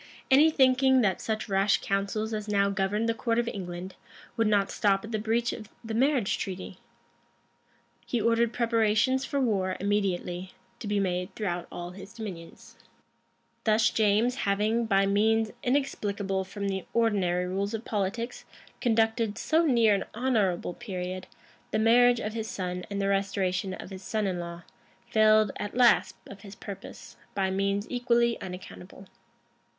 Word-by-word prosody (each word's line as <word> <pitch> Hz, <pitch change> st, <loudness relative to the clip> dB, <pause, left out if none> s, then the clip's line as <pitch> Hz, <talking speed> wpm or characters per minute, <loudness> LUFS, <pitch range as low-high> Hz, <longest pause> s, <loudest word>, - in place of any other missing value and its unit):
[*] -, -, -25 dB
Any 290 Hz, +4 st, +7 dB
thinking 265 Hz, -2 st, +4 dB
that 195 Hz, -5 st, +1 dB
such 215 Hz, -1 st, -2 dB
rash 195 Hz, 0 st, +2 dB
counsels 200 Hz, +3 st, -2 dB
as 215 Hz, 0 st, -4 dB
now 200 Hz, -1 st, +2 dB
governed 200 Hz, +3 st, 0 dB
the 230 Hz, -, +2 dB
court 230 Hz, +1 st, -1 dB
of 235 Hz, 0 st, +1 dB
England, 185 Hz, -3 st, -5 dB, 0.4 s
would 225 Hz, -2 st, +2 dB
not 205 Hz, -2 st, +2 dB
stop 195 Hz, 0 st, +1 dB
at 220 Hz, -, -9 dB
the 215 Hz, -, -1 dB
breach 230 Hz, +2 st, 0 dB
of 215 Hz, -2 st, -9 dB
the 225 Hz, -1 st, -5 dB
marriage 255 Hz, -2 st, +2 dB
treaty, 190 Hz, -1 st, -6 dB, 1.3 s
he 240 Hz, -, 0 dB
ordered 230 Hz, +1 st, +2 dB
preparations 230 Hz, +3 st, +2 dB
for 280 Hz, -, -2 dB
war 195 Hz, -7 st, 0 dB
immediately 190 Hz, -3 st, -1 dB, 0.3 s
to 220 Hz, -, -6 dB
be 205 Hz, 0 st, +1 dB
made 180 Hz, -2 st, -2 dB
throughout 180 Hz, -5 st, -3 dB
all 175 Hz, 0 st, -6 dB
his 190 Hz, +2 st, -11 dB
dominions.[] 190 Hz, -8 st, -9 dB, 0.9 s
Thus 215 Hz, 0 st, +3 dB
James, 220 Hz, +4 st, +2 dB
having, 215 Hz, +4 st, +1 dB
by 195 Hz, -2 st, +3 dB
means 220 Hz, +2 st, +2 dB
inexplicable 205 Hz, -8 st, -1 dB
from 200 Hz, +1 st, -5 dB
the 190 Hz, -2 st, -2 dB
ordinary 195 Hz, -6 st, +2 dB
rules 200 Hz, +4 st, -2 dB
of 225 Hz, -, -7 dB
politics, 220 Hz, +4 st, -3 dB, 0.4 s
conducted, 225 Hz, -2 st, +1 dB
so 320 Hz, +7 st, +2 dB
near 230 Hz, -6 st, +4 dB
an 200 Hz, -, -1 dB
honorable 215 Hz, -9 st, 0 dB
period, 185 Hz, -4 st, -5 dB, 0.4 s
the -, -, -1 dB
marriage 240 Hz, +2 st, +5 dB
of 215 Hz, -2 st, -4 dB
his 225 Hz, -1 st, -4 dB
son 180 Hz, -1 st, -4 dB
and 200 Hz, -1 st, -3 dB
the 195 Hz, -, 0 dB
restoration 195 Hz, -1 st, 0 dB
of 185 Hz, -, -10 dB
his 190 Hz, -1 st, -8 dB
son 215 Hz, +2 st, -2 dB
in 185 Hz, -2 st, -1 dB
law, 170 Hz, 0 st, -7 dB, 0.5 s
failed 215 Hz, -1 st, +5 dB
at 205 Hz, +3 st, -5 dB
last 245 Hz, -2 st, +4 dB
of 200 Hz, -1 st, -11 dB
his 200 Hz, -1 st, -11 dB
purpose, 200 Hz, -1 st, -10 dB, 0.2 s
by 190 Hz, -1 st, 0 dB
means 200 Hz, +1 st, 0 dB
equally 240 Hz, -1 st, +1 dB
unaccountable. 180 Hz, +1 st, -9 dB
210 Hz, 155 wpm, -28 LUFS, 195-230 Hz, 1.3 s, Any